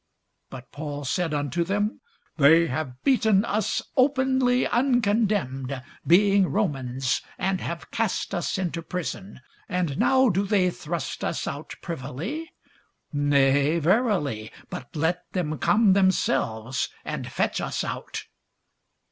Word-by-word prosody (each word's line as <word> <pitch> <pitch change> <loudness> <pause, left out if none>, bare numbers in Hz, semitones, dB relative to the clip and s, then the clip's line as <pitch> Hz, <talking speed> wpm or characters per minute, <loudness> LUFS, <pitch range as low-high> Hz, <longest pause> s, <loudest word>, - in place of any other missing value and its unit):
But 130 -1 -10
Paul 145 -1 -5
said 170 +4 0
unto 150 +3 -1
them, 205 +4 -1 0.4
They 160 +3 +6
have 130 -3 -4
beaten 220 -6 +3
us 215 -1 0
openly 260 -2 +3
uncondemned, 205 - +1 0.3
being 195 +2 +5
Romans, 135 - -1 0.2
and 190 0 -1
have 170 0 -6
cast 225 -3 -1
us 175 -3 -1
into 175 -2 -2
prison; 155 - -5 0.3
and 175 -6 -1
now 260 -1 +4
do 195 0 +1
they 190 -3 +3
thrust 165 -2 -5
us - - -2
out - - -6
privily? 170 - -5 0.6
nay 145 +1 +3
verily; 165 - +1 0.2
but 125 - -8
let 160 +4 -1
them 155 -5 -2
come 210 -2 +4
themselves 130 - +1 0.2
and - - -4
fetch - - 0
us - - -2
out. - - -5
175 Hz, 120 wpm, -25 LUFS, 145-205 Hz, 0.6 s, They